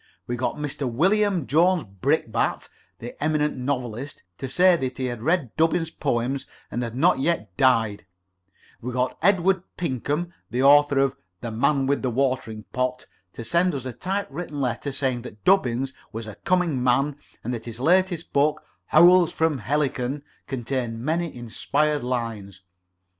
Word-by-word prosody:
We 120 - -3
got 125 +1 -2
Mr. 145 -3 -3
William 190 - +2
Jones 170 +6 +3
Brickbat, 95 -2 -1 0.3
the 120 +4 -8
eminent 150 -1 +1
novelist, 130 0 -4 0.2
to 135 - -4
say 180 +6 +5
that 130 -5 -3
he 130 - -2
had 120 -3 -4
read 150 -4 0
Dubbins's 165 0 +2
poems, 135 -1 -1 0.2
and 120 - -2
had 120 -1 -4
not 130 - +3
yet 135 - -1
died; 110 -5 +2 0.7
we 125 - -4
got 125 0 0
Edward 190 0 +3 0.2
Pinkham, 160 +2 -2 0.2
the 125 +3 0
author 145 0 +6
of 135 -1 +2 0.3
"The 115 - -4
Man 135 +4 +2
with 140 +1 +1
the 130 - 0
Watering 125 -4 -1
pot," 125 0 -1 0.3
to 115 - -7
send 170 +6 +2
us 130 -2 -5
a 130 - -4
type 190 - -2
written 150 -1 -5
letter, 130 +2 -2
saying 130 -3 -1
that 105 -3 -11
Dubbins 130 -8 +2 0.2
was 115 +1 -6
a 110 - -8
coming 170 - 0
man, 135 +3 +2 0.3
and 125 - -3
that 115 -2 -5
his 115 0 -8
latest 175 +3 +2
book, 150 +2 +2 0.2
Howls 175 +1 +6
from 160 -5 0
Helicon, 140 +1 -1 0.2
contained 120 -2 -3
many 165 +1 -1
inspired 145 +5 -1
lines. 115 -6 -4
135 Hz, 160 wpm, -24 LUFS, 120-160 Hz, 0.7 s, author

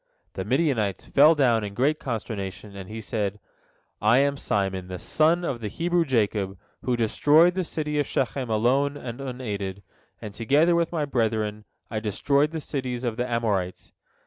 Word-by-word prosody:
The - - -4
Midianites 115 - 0
fell 150 +4 +6
down 120 -6 +3
in 100 -1 -6
great 145 +7 +1
consternation, 105 -4 -5
and 95 -2 -8
he 110 +1 -6
said: 105 -2 -2 0.6
"I 110 +4 +5
am 140 +1 +3
Simon, 95 -7 -1
the 90 0 -5
son 165 - +2
of 125 -7 -3
the 110 - -3
Hebrew 170 - 0
Jacob, 105 -7 0 0.2
who 125 - 0
destroyed 150 +9 +4
the 185 0 -1
city 150 -3 -2
of 145 - 0
Shechem 130 -1 -1
alone 130 +6 +2
and 125 -1 -7
unaided, 105 -7 -5 0.4
and 105 - -8
together 145 +10 +3
with 170 -1 +1
my 160 -4 -1
brethren 110 -5 -1 0.3
I 110 - -1
destroyed 140 +8 +1
the 160 0 -4
cities 130 -4 -4
of 120 -3 -1
the 125 +1 -2
Amorites. 105 -6 -1
120 Hz, 170 wpm, -25 LUFS, 105-145 Hz, 0.6 s, fell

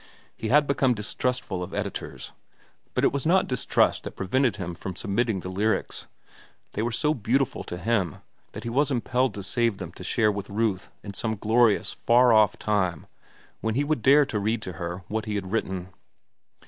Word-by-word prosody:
He 110 - -4
had 145 +5 +5
become 135 -3 +2
distrustful 105 -2 -2
of 90 +1 -5
editors. 100 -1 -5 0.6
But - - +1
it - - +4
was 140 - -1
not 185 +4 +4
distrust 125 - +2
that - - -7
prevented 120 +4 +1
him 90 -4 -5
from 90 +2 -6
submitting 100 +1 0
the 90 - -6
"Lyrics." 105 +4 -1 0.6
They 105 - -3
were 120 +2 0
so 150 +7 +1
beautiful 130 +1 0
to 90 - -5
him 95 -5 0 0.4
that 105 - -7
he 120 - -3
was 140 +4 +2
impelled 130 0 0
to 100 - -5
save 115 0 +1
them 90 -4 -6
to 90 - -11
share 105 +3 +2
with 100 -1 -5
Ruth 100 -2 -1
in 100 - -7
some 110 +2 -2
glorious, 110 +1 +3
far 120 0 +4
off 110 -1 +5
time 95 -7 0 0.5
when 110 0 -1
he 140 - +2
would 145 -4 0
dare 140 +5 +6
to 105 - -2
read 110 +2 -1
to 95 - -5
her 85 +3 -5
what 110 0 -2
he 105 - -2
had 95 -2 -4
written. 95 -4 -2
110 Hz, 190 wpm, -26 LUFS, 95-125 Hz, 0.6 s, dare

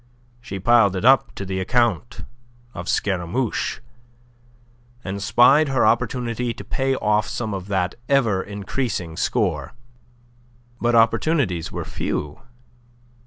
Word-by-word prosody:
She 100 -4 -6
piled 105 -2 +4
it 95 - -2
up 135 -1 +4
to 100 - -5
the 95 0 -3
account 120 -2 0 0.5
of 85 +1 -6
Scaramouche, 100 +5 -1 1.2
and 100 +1 -5
spied 135 +8 +5
her 135 -4 +2
opportunity 120 +1 0
to - - -9
pay 135 -1 -1
off 105 -3 +1
some 110 -3 -4
of 95 -1 -5
that 95 -3 -1 0.2
ever 115 -9 +2
increasing 100 -3 -4
score. - - -1 1.1
But 120 0 +2
opportunities 115 - +2
were - - -5
few. 75 0 -4
110 Hz, 120 wpm, -22 LUFS, 95-125 Hz, 1.2 s, spied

